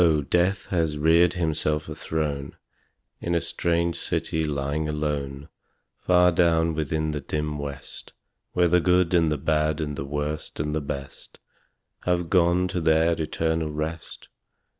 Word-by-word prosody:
Death 90 +2 +2
has 80 -4 0
reared 85 +3 +4
himself 80 -3 -1
a - - -5
throne 75 -3 -3 0.6
In 85 0 -1
a - - +4
strange 85 0 0
city 80 0 -1
lying 75 +1 -2
alone 75 -2 -3 0.5
Far 90 0 +4
down 85 -1 +3
within 80 0 -1
the 75 -1 -3
dim 75 +1 -3
West, 70 -2 -7 0.4
Where 90 -1 +3
the 90 +1 +4
good 90 0 +3
and 85 -3 +3
the 75 - 0
bad 75 +1 0
and 75 -2 -3
the 70 - -4
worst 75 +2 -4
and 75 +1 -1
the 75 - -1
best 70 -1 -7 0.7
Have 90 -2 0
gone 90 -1 +3
to 90 - -2
their 80 +1 +3
eternal 80 0 -1
rest. 75 +1 -5
80 Hz, 145 wpm, -25 LUFS, 75-85 Hz, 0.7 s, reared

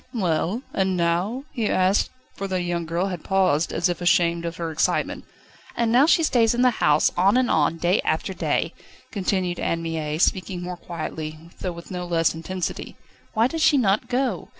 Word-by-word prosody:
"Well? 185 +3 0
And 190 -1 0
now?" 175 +9 0
he 225 -4 -1
asked, 185 +2 +2 0.2
for 195 - -5
the 185 -1 -1
young 170 -1 -2
girl 175 +4 -1
had 180 -4 -6
paused, 185 -5 +2
as 175 - +1
if 175 0 -3
ashamed 170 -1 +2
of 170 0 -4
her 165 -1 -3
excitement. 155 - 0 0.5
"And 235 -1 +1
now 260 +5 +5
she 330 0 +4
stays 240 -5 +3
in 245 - +2
the 250 - +5
house, 150 0 +4
on 195 +6 +4
and 255 -1 +2
on, 155 +1 +2
day 175 +4 +2
after 160 +4 -1
day," - - -1 0.4
continued 185 -3 -1
Anne 165 0 -1
Mie, 155 -2 -3
speaking 180 +1 0
more 180 0 -4
quietly, 155 -2 -6 0.2
though 185 - -3
with 170 +2 -11
no 180 -1 -4
less 165 -2 +2
intensity. 180 +2 -5 0.4
"Why 220 +1 +4
does 320 +6 -2
she 295 - +5
not 210 -5 +2
go? 250 -6 -1
180 Hz, 190 wpm, -24 LUFS, 170-210 Hz, 0.5 s, now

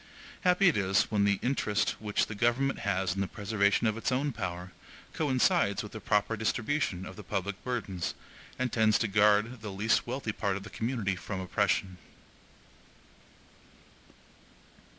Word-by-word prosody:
Happy 180 +1 +4
it 165 - +4
is 95 -1 +3
when 105 -2 +2
the 100 -1 +3
interest 110 -5 +1
which 105 -1 0
the - - -7
government 120 +6 +1
has 95 -2 0
in 100 - -2
the 100 - 0
preservation 105 +1 +1
of 110 -1 +2
its 115 - -1
own 140 +3 0
power, 90 -5 -5 0.4
coincides 130 -9 +2
with 105 - -9
a 110 - -6
proper 105 +2 +1
distribution 110 - -1
of 95 - -9
the 105 - -9
public 95 +2 -3
burdens, 100 -8 -3 0.4
and 125 -1 -2
tends 110 -2 +4
to 115 - 0
guard 105 +3 +3
the 105 -2 -5
least 105 +5 +1
wealthy 125 -2 -2
part 100 -2 -1
of 100 - -8
the 105 - -10
community 110 -4 -1
from 95 +1 -5
oppression! 95 0 0
105 Hz, 155 wpm, -30 LUFS, 100-120 Hz, 0.4 s, Happy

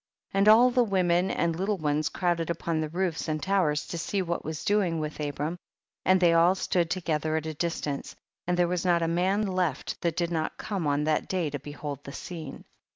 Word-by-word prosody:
8. - - -1
And 200 - +4
all 240 +4 +7
the 245 0 +4
women 185 -3 +2
and 170 -1 0
little 195 +4 -1
ones 150 -1 0
crowded 170 -2 -1
upon 165 -1 -1
the 155 - -2
roofs 175 0 -2
and 155 -1 -1
towers 155 -3 +1
to 170 - -5
see 195 +4 -1
lohat 170 -1 -2
ivas 155 0 -5
doing 200 -6 +2
with 155 0 -4
Abram, 150 +3 -3 0.4
and 185 0 +4
they 175 -2 +5
all 170 +3 +5
stood 175 -3 0
together 160 -4 -1
at 160 0 -1
a 160 - -3
distance; 150 -3 -3 0.3
and 180 0 +1
there 175 -1 +3
was 180 -1 -1
not 175 -2 +3
a - - +1
man 185 +5 +1
left 180 -7 -2
that 170 -2 -1
did 170 -1 0
not 160 -2 -2
come 190 -7 -3
on 145 +1 +1
that 155 0 0
day 175 -6 -1
to 145 - -4
behold 145 0 -7
the 140 - -9
scene. 160 -6 -7
170 Hz, 220 wpm, -27 LUFS, 155-185 Hz, 0.4 s, all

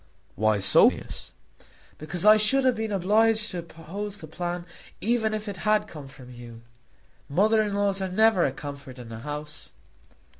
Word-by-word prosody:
"Why 110 -1 +1
so, 95 - +6
Phineas?" - - -9 0.7
"Because 165 +5 -3
I 215 0 +9
should 220 +6 +3
have 255 - +4
been 220 -1 -4
obliged 215 +3 +2
to 180 - -4
oppose 170 +5 -7
the 165 - -9
plan 175 +2 -5 0.3
even 225 -1 0
if 215 0 -4
it 200 -2 -5
had 210 +3 +1
come 150 -7 -10
from 130 -2 -13
you. 120 -1 -12 0.7
Mothers 215 +7 +2
in 205 - -4
law 200 -1 +1
are 190 - -4
never 215 -2 +4
a 135 - +1
comfort 140 -2 -9
in 120 -2 -10
a 110 - -7
house." 150 +3 -7
180 Hz, 175 wpm, -26 LUFS, 145-215 Hz, 0.7 s, I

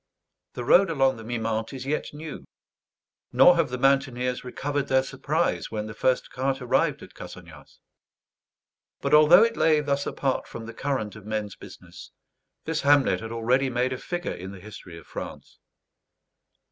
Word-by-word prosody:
The 125 - -5
road 190 +10 +5
along 135 -5 +2
the 115 - -10
Mimente 115 0 -3
is 130 - -7
yet 150 +2 -2
new, 150 0 -8 0.9
nor 180 - +7
have 165 -5 +1
the 125 - -4
mountaineers 125 -2 +1
recovered 140 +3 -3
their 130 0 +3
surprise 145 +6 -1
when 105 -1 -4
the 110 - -7
first 130 +3 0
cart 135 +1 -1
arrived 125 -2 0
at - - -13
Cassagnas. - - -12 1.2
But 140 +1 -2
although 155 +6 +8
it 230 0 +1
lay 155 -2 +3
thus 140 -1 -1
apart 135 -2 -2
from 115 - -8
the 115 - -8
current 130 -7 -3
of 105 -1 -12
men's 105 -2 -3
business, - - -13 0.6
this 160 -1 -1
hamlet 145 -1 +4
had 115 0 -7
already 125 +4 +1
made 125 +1 0
a - - -4
figure 175 -1 -4
in 95 +2 -8
the 100 - -10
history 90 -3 -11
of 85 - -13
France. - - -9
130 Hz, 165 wpm, -25 LUFS, 115-145 Hz, 1.2 s, although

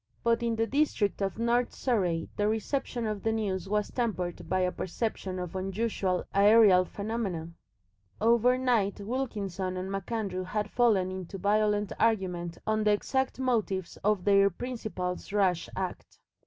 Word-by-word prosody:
But 235 0 +2
in 230 -1 0
the 225 0 +1
district 255 -7 0
of 195 -1 -1
North 235 +1 +1
Surrey 180 -10 0
the 205 - +1
reception 230 +2 -1
of 210 -2 -2
the 225 - 0
news 195 -4 -2
was 210 0 0
tempered 195 -8 -2
by 185 0 +1
a 180 0 +1
perception 190 0 -3
of 180 0 -5
unusual 190 -1 -1
aerial 200 -2 +6
phenomena. 200 -6 -3 0.7
Overnight 235 -2 +3
Wilkinson 200 -6 -3
and 185 +1 -4
MacAndrew 195 -1 -3
had 210 +2 -2
fallen 210 -7 +3
into 185 0 -6
violent 210 +1 +1
argument 180 -6 0
on 215 0 +1
the 210 - +4
exact 265 +5 -1
motives 215 -8 -1
of 205 -2 +1
their 200 -1 +5
principal's 205 -5 -5
rash 185 -5 +1
act. 185 -1 -5
205 Hz, 140 wpm, -29 LUFS, 185-230 Hz, 0.7 s, aerial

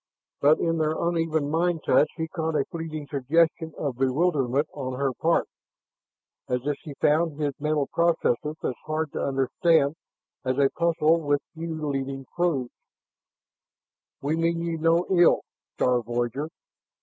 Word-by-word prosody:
But 150 +2 +5
in 165 -1 0
their 155 0 +1
uneven 165 -3 0
mind 165 0 +1
touch 150 - +4
he 160 -1 -2
caught 160 -1 -3
a 140 -2 +2
fleeting 160 -3 -5
suggestion 160 +4 +1
of 140 -5 -3
bewilderment 140 0 +1
on 130 -3 -4
her 135 -2 +1
part, 165 +6 +1 1.0
as 125 0 -1
if 145 0 0
she 145 -3 -9
found 155 0 +2
his 145 -2 0
mental 150 -1 +1
processes 155 -4 +1
as - - 0
hard 155 -1 -1
to - - -2
understand 140 +3 +2 0.5
as 130 -1 -1
a 140 -1 +3
puzzle 165 -1 +2
with 145 -1 +1
few 160 -2 -4
leading 135 -1 -3
clues. 155 -8 0 1.5
"We 150 +3 +1
mean 165 +1 0
you 165 -1 -2
no 165 +2 +3
ill, 175 -2 +5 0.3
star 125 -1 +2
voyager. 120 +5 -2
155 Hz, 145 wpm, -26 LUFS, 140-165 Hz, 1.5 s, But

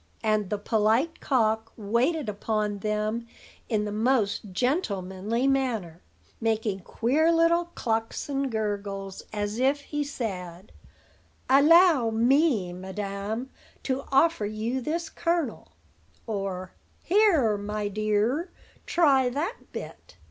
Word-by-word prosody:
And 215 -3 +1
the 210 - -1
polite 220 +9 +1
cock 225 -3 +1
waited 240 +8 0
upon 210 0 -2
them 215 +3 -2 0.4
in 210 -2 +1
the 210 - -3
most 215 -2 0
gentlemanly 210 - -1
manner, 230 -11 0 0.4
making 220 -3 0
queer 275 - +1
little 335 +1 +3
clucks 225 -1 -2
and 275 -2 -1
gurgles 200 -3 -3
as 210 +1 -3
if 275 +3 +2
he 295 +1 -3
said: 190 -9 -6 0.8
"Allow 295 -1 +6
me, 235 - +2
madam, 200 +6 -5 0.3
to 265 0 -1
offer 275 -5 +3
you 220 +5 -2
this 325 +5 -2
kernel;" 320 - -2 0.5
or, 195 -4 -4 0.3
"Here, 340 - +4
my 205 +1 -3
dear, 215 - 0 0.4
try 275 -7 +4
that 310 - -4
bit." - - -9
225 Hz, 110 wpm, -27 LUFS, 205-275 Hz, 0.8 s, Allow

